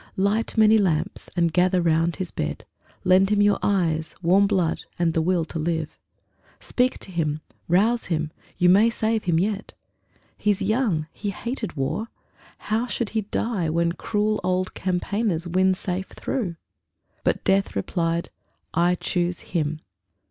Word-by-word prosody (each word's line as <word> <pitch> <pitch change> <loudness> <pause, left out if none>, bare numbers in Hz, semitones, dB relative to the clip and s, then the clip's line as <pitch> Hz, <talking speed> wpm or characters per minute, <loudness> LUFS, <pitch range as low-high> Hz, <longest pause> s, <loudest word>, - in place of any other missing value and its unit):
Light 205 +4 +1
many 220 0 +6
lamps 170 -7 -1
and 170 -2 +2
gather 180 +1 +3
round 165 0 +2
his 185 -2 -4
bed. 75 -1 -4 0.4
Lend 185 +1 +5
him 210 -1 +2
your 205 0 +4
eyes, 165 -5 0
warm 190 +4 +5
blood, 185 -5 0
and 170 -2 +1
will 165 +1 +2
to 165 - -5
live. 160 -1 -2 0.6
Speak 250 +1 0
to 190 - -8
him; 155 -3 -1 0.3
rouse 220 +7 +3
him; 155 -3 -1 0.3
you 180 - +3
may 200 +6 +6
save 225 -1 -1
him 170 -3 +2
yet. 205 +2 -2 0.6
He's 205 -2 +1
young; 205 -6 +1
he 205 - -4
hated 225 - -4
war; 135 +12 -1 0.5
how 225 +3 -1
should 235 -3 -2
he 220 - 0
die 205 -4 -1
When 170 +1 +1
cruel 210 +4 0
old 185 0 0
campaigners 185 -1 -1
win 185 +2 +3
safe 185 0 -3
through? 195 -10 -3 0.7
But - - +1
Death 195 0 +2
replied: 165 - -1 0.4
"I 175 +1 +3
choose 175 0 -1
him." 155 -3 -2
185 Hz, 150 wpm, -24 LUFS, 170-210 Hz, 0.7 s, many